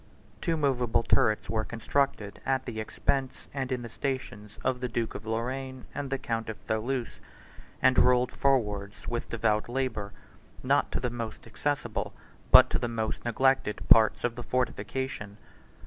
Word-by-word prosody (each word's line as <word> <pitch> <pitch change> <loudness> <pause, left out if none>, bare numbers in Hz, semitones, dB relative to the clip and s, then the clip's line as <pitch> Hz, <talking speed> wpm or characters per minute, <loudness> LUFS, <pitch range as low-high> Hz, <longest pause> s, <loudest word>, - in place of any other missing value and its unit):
Two 165 -2 0
movable 125 -6 +2
turrets 110 -2 +2
were 110 -1 0
constructed 115 -2 -1
at 135 -1 0
the 110 -3 -5
expense, 130 +4 -2
and 135 -2 -3
in 125 -1 -1
the - - -5
stations, 115 -5 -4
of 130 -1 +1
the 125 - -1
duke 115 -1 -2
of 110 - -8
Lorraine 130 +3 -3
and 140 - -4
the 135 - 0
count 115 -3 -3
of 110 - -5
Tholouse, 120 +3 -2 0.6
and 130 0 +6
rolled 125 0 +4
forwards 105 -8 0
with 120 +1 -3
devout 110 -1 +1
labor, 120 -6 -2 0.5
not - - +2
to - - 0
the 125 -1 -2
most 115 -2 -6
accessible, 135 +1 -2 0.3
but - - +9
to - - +1
the 120 - -1
most 110 -2 -3
neglected, 125 -2 +1
parts 110 -1 +6
of 120 - +1
the 120 - -5
fortification. 125 -4 -2
120 Hz, 160 wpm, -29 LUFS, 110-130 Hz, 0.6 s, but